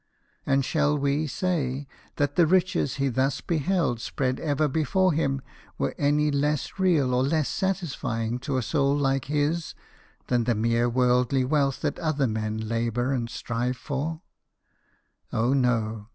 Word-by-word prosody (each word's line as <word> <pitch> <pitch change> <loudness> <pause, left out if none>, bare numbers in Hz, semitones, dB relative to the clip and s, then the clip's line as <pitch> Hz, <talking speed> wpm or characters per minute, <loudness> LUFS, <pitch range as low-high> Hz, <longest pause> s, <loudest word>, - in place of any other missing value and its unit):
And 135 -1 +2
shall 150 +1 +1
we 140 +2 0
say 145 -5 -2 0.3
that 145 -1 0
the 170 -2 +5
riches 180 -6 +2
he 140 -1 0
thus 135 +2 0
beheld 165 -6 0
spread 130 0 -2
ever 150 -1 +1
before 160 +6 +2
him 135 -3 0 0.3
were 70 - -1
any 150 +1 +2
less 145 +5 -1
real 160 -9 +3
or 125 - +2
less 150 +2 +1
satisfying 130 -11 -2
to 135 +1 -2
a 130 - 0
soul 140 +3 +1
like 135 -2 +1
his 150 +3 -1 0.5
than 120 -2 +1
the 120 -1 +2
mere 115 +2 +1
worldly 125 +1 +2
wealth 140 -1 +1
that - - -2
other 155 -4 0
men 110 -1 -2
labour 115 +3 0
and 120 -3 -2
strive 120 +2 -2
for? 155 +6 -4 1.1
Oh 120 +4 +1
no. 115 -5 0
135 Hz, 150 wpm, -26 LUFS, 125-150 Hz, 1.1 s, the